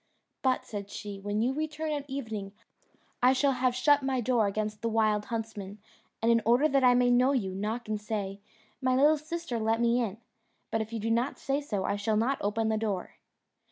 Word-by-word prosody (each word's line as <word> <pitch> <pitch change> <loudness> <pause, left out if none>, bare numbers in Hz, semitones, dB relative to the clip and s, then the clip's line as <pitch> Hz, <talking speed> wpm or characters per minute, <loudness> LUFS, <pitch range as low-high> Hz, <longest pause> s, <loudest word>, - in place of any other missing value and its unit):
"But," 260 -1 +1
said 200 -2 -6
she, 205 -2 -7
"when 205 +2 -1
you 255 +3 +1
return 310 +1 -3
at 290 -1 -3
evening 220 -7 -5 0.7
I 255 +1 +6
shall 275 +1 +3
have 255 -1 +1
shut 290 +3 +4
my 265 -1 0
door 240 -3 +2
against 210 +1 -3
the 230 - 0
wild 215 -2 +2
huntsmen, 215 -3 -5 0.5
and 230 - +4
in 230 0 +4
order 245 +7 +4
that 275 -3 +2
I 250 -1 +6
may 245 0 +4
know 250 +3 +4
you, 195 -8 -1
knock 215 +5 -3
and 215 -1 -2
say, 200 -2 -4 0.4
'My 255 -1 +2
little 295 +3 +5
sister, 310 -5 -4
let 225 +1 +1
me 235 +1 +3
in;' 215 -3 -3 0.5
but 225 - +1
if 220 +1 -5
you 230 - -3
do 225 +2 -1
not 240 +4 0
say 275 +1 -1
so, 210 -9 -2
I 200 +2 -1
shall 210 +1 0
not 250 +5 +1
open 220 +2 0
the 220 - +1
door." 205 -4 -3
230 Hz, 210 wpm, -29 LUFS, 210-260 Hz, 0.7 s, I